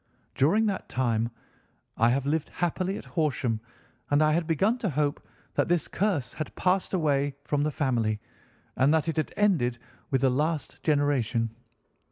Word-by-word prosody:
During 195 +11 +3
that 200 -3 -2
time 115 -3 0 0.7
I 115 +1 +4
have 135 +2 +1
lived 155 +2 0
happily 180 +3 -1
at - - -9
Horsham, 130 -8 0 0.5
and 145 +1 +4
I 155 - +4
had 165 0 0
begun 195 - +2
to 210 - -1
hope 145 0 -1 0.3
that - - +1
this 175 -1 +1
curse 185 -10 -1
had 155 - -5
passed 185 +1 +1
away 145 -4 +1
from 145 -1 0
the 150 - +1
family, 120 -8 0 0.6
and 135 +3 +4
that 160 0 +1
it 165 - -1
had 155 - 0
ended 160 -13 +2 0.3
with 135 -2 +1
the 135 -1 +4
last 150 +2 -1
generation. 135 -7 +1
145 Hz, 165 wpm, -27 LUFS, 130-170 Hz, 0.7 s, I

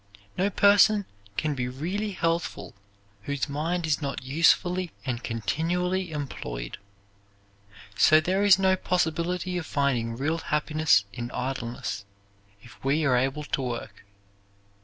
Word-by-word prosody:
No 195 +2 +1
person 205 +1 +5 0.3
can 155 -1 0
be 125 -3 -2
really 175 +12 -3
healthful 165 -1 -2 0.5
whose 140 -1 -2
mind 160 +4 -2
is 155 -1 0
not 140 -3 -4
usefully 175 +6 +2 0.2
and 120 -3 -3
continually 175 - -1
employed. - - -5 1.2
So 155 +9 +6
there 185 +5 0
is 200 -3 +7
no 190 -1 +3
possibility 180 0 -1
of 165 - -7
finding 120 -5 0
real 155 +5 -1
happiness 155 -7 +2
in 120 -1 -5
idleness 125 -5 -4 0.6
if 120 - -16
we 145 +4 +1
are 130 -3 +3
able 135 +4 0
to 145 - -2
work. 120 -2 -5
155 Hz, 125 wpm, -26 LUFS, 130-180 Hz, 1.2 s, is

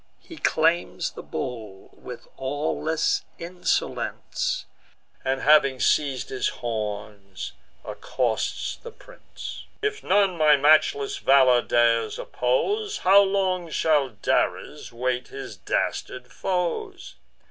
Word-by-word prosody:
He 330 - -12
claims 165 - +1
the - - -9
bull 110 -7 -7
with - - -10
awless 150 +3 -1
insolence, 175 +1 -2 0.6
And 135 0 -1
having 140 -3 +4
seiz'd 140 -3 +1
his 130 - -1
horns, 105 -4 -5 0.3
accosts 120 -4 -2
the 475 - -10
prince: - - -11
"If 425 0 -2
none 195 -2 +2
my 155 -1 +6
matchless 145 -1 +3
valour 130 -3 +5
dares 115 -2 +2
oppose, 410 - -1
How 195 +2 +6
long 190 -3 0
shall 150 -3 +2
Dares 105 -5 -1
wait 125 +1 -2
his - - -8
dastard 125 0 -3
foes? 195 - -3
140 Hz, 105 wpm, -25 LUFS, 125-180 Hz, 0.6 s, my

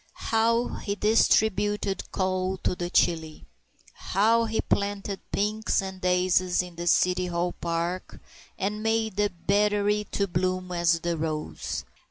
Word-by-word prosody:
How 230 +2 +2
he 200 - -3
distributed 210 -2 +2
coal 185 0 -1
to - - +1
the 175 -1 -4
chilly! 160 -3 0 0.5
How 225 +4 +2
he 220 0 -2
planted 200 -1 -1
pinks 215 +2 0
and 190 -1 -5
daisies 180 0 +2
in 180 -1 -11
the 170 +1 -5
City 180 +1 +3
Hall 175 0 -1
Park, 170 +2 -3 0.4
and 210 +2 -2
made 220 -2 0
the 210 0 +2
Battery 205 +3 +1
to 200 - 0
bloom 185 +1 -1
as 170 -1 +2
the 170 0 -1
rose! 155 - -4
185 Hz, 135 wpm, -26 LUFS, 175-210 Hz, 0.5 s, City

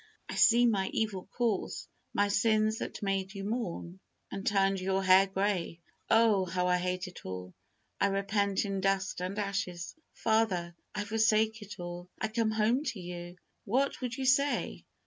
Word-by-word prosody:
I - - -6
see 240 0 +6
my 200 -5 +2
evil 205 -5 -2
course, 225 -1 -2 0.2
my 205 0 +2
sins 215 +1 +2
that - - -5
made 195 0 -1
you 195 - -5
mourn, 195 -5 -4 0.3
and 195 0 -5
turned 195 -1 +2
your 190 +1 0
hair 190 +1 +6
grey. 190 -3 -1 0.3
Oh! 225 -4 +5
how 180 0 -1
I 180 0 +3
hate 180 0 -2
it 180 - -11
all. 90 -1 -6 0.5
I - - +4
repent 200 0 0
in 195 -1 -2
dust 195 -1 0
and 185 +3 -3
ashes. 195 -4 -3 0.2
Father! 210 -6 +1 0.2
I 205 - -1
forsake 220 +1 +2
it 205 -2 -9
all! 175 0 -7
I 220 - -1
come 225 0 +1
home 220 +5 +2
to 220 - -3
you!" 175 0 -7 0.3
What 270 +7 0
would 250 -1 -3
you 265 - -2
say? 275 +2 +1
195 Hz, 165 wpm, -31 LUFS, 185-220 Hz, 0.5 s, see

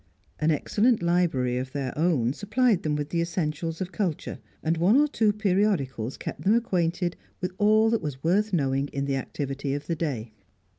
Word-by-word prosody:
An 155 - +2
excellent 210 - +2
library 165 -8 +1
of 130 0 -6
their 135 -3 -3
own 150 -7 +2
supplied 215 - +1
them 150 -1 -1
with 145 0 -3
the 170 +1 0
essentials 165 -1 -2
of 185 0 -3
culture, 175 -3 -3 0.2
and 160 +1 +1
one 185 +9 +4
or 300 - +4
two 220 -7 +2
periodicals 185 - 0
kept - - -6
them 205 +4 +3
acquainted 175 -6 0 0.2
with 180 0 -2
all 215 +2 +4
that 230 - +1
was 145 -4 -5
worth 200 +6 +2
knowing 135 -5 +1
in 140 0 -3
the 140 -1 0
activity 140 +1 -3
of 145 0 -5
the 165 - -1
day. 125 -9 -3
165 Hz, 185 wpm, -26 LUFS, 140-200 Hz, 0.2 s, one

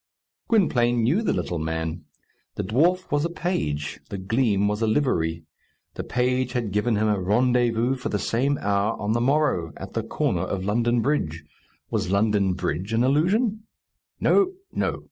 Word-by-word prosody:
Gwynplaine 120 - +2
knew 150 - +2
the 225 - 0
little 85 - -2
man. 80 0 -3 0.5
The - - -2
dwarf 165 - +1
was 145 0 +2
a 170 - 0
page. 75 - -2
The 100 - -4
gleam 100 0 +1
was 105 +2 -1
a 115 - +2
livery. 85 - 0 0.5
The - - -5
page 125 0 0
had 115 -5 -2
given 105 +3 +1
him 110 +1 +1
a 105 -2 +1
rendezvous 120 +4 +2
for 125 - -4
the 105 - 0
same 135 +7 0
hour 100 +2 0
on 105 +1 0
the 120 - 0
morrow, 135 - +1
at - - -8
the - - -1
corner - - -1
of 95 -1 -3
London 120 +3 +1
Bridge. 85 - -1 0.5
Was - - -1
London 100 -1 +2
Bridge 90 +3 -3
an 115 +2 +2
illusion? 205 - +1 0.5
No, 385 -2 +3 0.2
no. - - -1
115 Hz, 165 wpm, -24 LUFS, 100-135 Hz, 0.5 s, No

